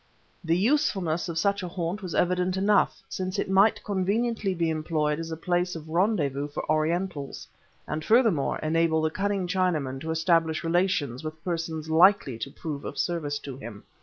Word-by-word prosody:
The 165 0 +2
usefulness 195 - +1
of 165 - -4
such 200 +4 +1
a 180 - -4
haunt 175 +3 -3
was 180 -4 -5
evident 180 +1 +1
enough, 200 +2 +2
since 185 +1 -4
it 190 - -1
might 195 +3 +4
conveniently 205 +1 0
be 165 -1 0
employed 155 -1 -1
as 165 0 -5
a 160 - -4
place 180 +1 0
of 160 -1 -8
rendezvous 160 -6 0
for 145 - -6
Orientals 155 -1 -1 0.4
and 155 +1 -3
furthermore 220 - +3
enable 160 0 +2
the 160 - +1
cunning 200 +1 -1
Chinaman 160 -8 0
to 160 - -5
establish 160 0 +1
relations 165 -7 0
with 155 +1 -7
persons 165 -3 -3
likely 160 - +4
to 140 - -4
prove 145 0 -6
of - - -6
service 155 -5 -1
to 135 -3 -6
him. 115 -6 -9
165 Hz, 170 wpm, -27 LUFS, 155-190 Hz, 0.4 s, might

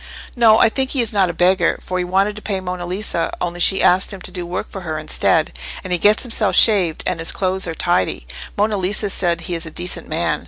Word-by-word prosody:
"No, 225 -3 +5
I - - +5
think 265 +3 -1
he 270 - 0
is 230 - 0
not 195 -3 +2
a - - 0
beggar, 175 +1 +2
for 185 0 -4
he - - 0
wanted 195 +3 0
to 215 - -9
pay 200 -3 -3
Monna 180 -1 -5
Lisa, 185 -2 -2
only 175 0 -4
she 190 +2 +3
asked 185 +3 +3
him 195 - -6
to - - -6
do 175 -2 -6
work 180 +2 -5
for 195 - -7
her 160 -3 -4
instead. 155 - +1 0.3
And 180 - -2
he 175 - +1
gets 210 +5 +4
himself 225 -4 0
shaved, 190 -8 +4
and 170 - -2
his 165 - 0
clothes 190 -1 -1
are 165 - -4
tidy: 95 - 0 0.3
Monna 210 +1 +1
Lisa 195 +2 -1
says 170 -3 0
he 175 +1 -5
is 165 -1 -4
a - - -5
decent 175 +3 -4
man. 160 -1 0
185 Hz, 245 wpm, -19 LUFS, 175-205 Hz, 0.3 s, No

